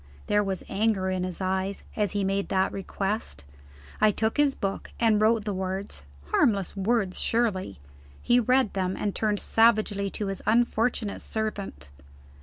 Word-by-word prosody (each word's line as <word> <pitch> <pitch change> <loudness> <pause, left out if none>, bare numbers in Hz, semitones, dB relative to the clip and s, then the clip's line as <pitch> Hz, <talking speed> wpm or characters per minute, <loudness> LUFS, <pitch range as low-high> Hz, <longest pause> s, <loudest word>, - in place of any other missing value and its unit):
There 210 0 +2
was 195 -2 -3
anger 195 -2 0
in 185 -1 -1
his 185 +1 -5
eyes 190 +1 -1
as 205 -4 0
he 205 -1 0
made 195 +1 -1
that 190 0 +1
request. 195 - -4 0.6
I 215 - +6
took 220 +2 -1
his 290 -2 +3
book, 195 -1 -3
and 220 -2 +3
wrote 220 0 +3
the 205 - -1
words 190 - -4 0.3
harmless 200 -5 +2
words, 200 -1 0
surely? 210 - 0 0.4
He 240 +1 +3
read 250 -1 +2
them, 190 -1 -1
and 205 -2 -1
turned 210 -2 0
savagely 215 -3 +2
to 205 - -4
his 195 -1 -4
unfortunate 230 -1 +1
servant. 215 - -5
205 Hz, 155 wpm, -27 LUFS, 190-220 Hz, 0.6 s, I